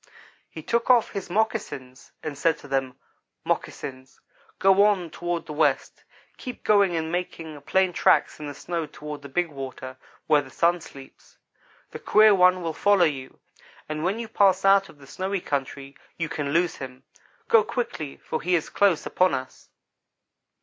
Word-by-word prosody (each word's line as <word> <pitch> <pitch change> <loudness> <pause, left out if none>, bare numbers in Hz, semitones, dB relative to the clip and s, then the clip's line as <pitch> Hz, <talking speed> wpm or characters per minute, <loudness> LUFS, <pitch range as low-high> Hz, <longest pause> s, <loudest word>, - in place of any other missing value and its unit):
"He 160 - -9
took 235 +7 0
off 245 -3 +5
his 200 -3 -5
moccasins 175 - -3
and 155 -2 -4
said 160 +2 +1
to - - -13
them: 135 -2 -2 0.5
'Moccasins, 130 0 -4 0.4
go 195 +1 +5
on 190 -6 +2
toward 175 -1 -3
the 155 - -7
west. 155 +1 0 0.3
Keep 250 -2 -8
going 200 -4 +4
and 160 0 -2
making 165 -4 -5
plain 185 +5 +1
tracks - - +2
in 150 - -6
the 145 - -7
snow 170 0 -4
toward 150 0 -8
the 140 - -10
big 175 +4 0
water 130 -2 -8 0.3
where 150 -1 +4
the 135 - -12
Sun 170 +5 +1
sleeps. 135 -3 -14 0.5
The - - -7
queer 215 0 +5
one 185 -1 +4
will 165 -1 -2
follow 200 +1 +4
you, 135 -4 -4 0.5
and 155 0 -4
when 190 +5 0
you 230 -1 -5
pass 195 -3 +3
out 195 0 +5
of - - -16
the 140 - -15
snowy 190 +7 -3
country, 140 -2 -4 0.2
you 165 -2 -2
can 150 -3 -3
lose 170 +2 +1
him. 130 -1 -9 0.4
Go 225 -2 +5
quickly 210 - -4
for 160 - -4
he 180 +1 +1
is 165 - -2
close 195 -6 +2
upon 185 -5 +2
us.' 130 0 -8
165 Hz, 170 wpm, -25 LUFS, 145-190 Hz, 0.5 s, off